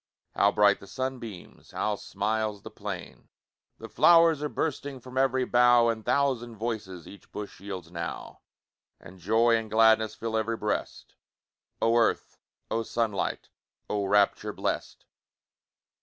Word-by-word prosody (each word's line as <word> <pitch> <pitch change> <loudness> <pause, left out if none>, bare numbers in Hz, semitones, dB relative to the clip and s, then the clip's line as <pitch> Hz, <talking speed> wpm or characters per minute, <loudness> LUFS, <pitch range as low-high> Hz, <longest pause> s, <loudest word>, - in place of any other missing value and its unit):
How 100 - +3
bright 105 -1 +4
the 100 - -13
sunbeams! 120 -4 -6
How 105 -1 -1
smiles 105 +1 -3
the 110 - -9
plain! 100 -4 -8 0.5
The - - -9
flow'rs 165 -3 +5
are 150 - -2
bursting 145 -3 -3
From 125 +1 -12
ev'ry 130 -1 +2
bough, 120 -1 +5
And 110 -1 -2
thousand 125 -4 0
voices 105 -6 -5
Each 100 - -14
bush 105 -1 -7
yields 95 -4 -7
now. 85 -2 -6 0.6
And 90 +2 -14
joy 115 +6 +3
and 110 -1 -5
gladness 110 0 +4
Fill 115 -1 -4
ev'ry 110 +1 -1
breast! 105 -1 -4 0.7
Oh 115 +1 +2
earth! 115 - 0 0.3
oh 115 - 0
sunlight! 115 -3 -2 0.4
Oh 105 -1 0
rapture 100 0 +2
blest! - - -4
110 Hz, 135 wpm, -27 LUFS, 100-120 Hz, 0.7 s, flow'rs